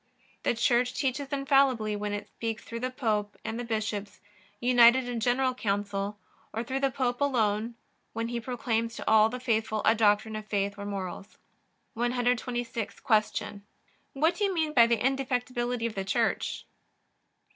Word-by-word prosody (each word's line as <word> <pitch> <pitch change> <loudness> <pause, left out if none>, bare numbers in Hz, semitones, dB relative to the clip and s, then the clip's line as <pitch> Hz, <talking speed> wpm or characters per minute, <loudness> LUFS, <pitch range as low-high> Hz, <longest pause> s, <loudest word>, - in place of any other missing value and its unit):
The - - +1
Church 245 +2 +2
teaches 270 0 -2
infallibly 270 -6 +2
when 205 0 -3
it 205 0 -4
speaks 225 -1 -5
through 230 - -6
the 255 +2 -2
Pope 215 -5 -1
and 225 +2 -3
the - - -3
bishops, 215 -3 -3 0.4
united 245 +1 +5
in 245 -1 -3
general 255 +3 +2
council, 205 -2 -2 0.3
or 225 - -3
through 260 +3 -2
the 275 0 +2
Pope 250 -1 -2
alone 230 -4 +1 0.4
when 230 +1 -3
he 240 0 -2
proclaims 230 -1 -2
to - - -7
all 220 0 +6
the 250 +2 -5
faithful 220 -3 0
a 220 - +6
doctrine 215 0 +2
of 215 0 -6
faith 200 -1 0
or 205 0 -6
morals. 195 0 -6 0.6
126. 240 -1 -1
Q. 215 -2 0 0.5
What 320 +5 +2
do - - -1
you 400 - +2
mean 315 -2 0
by 235 -4 +7
the 235 0 +2
indefectibility 250 -1 -1
of 230 - -2
the 195 - -3
Church? 190 - -1
235 Hz, 160 wpm, -28 LUFS, 215-250 Hz, 0.6 s, by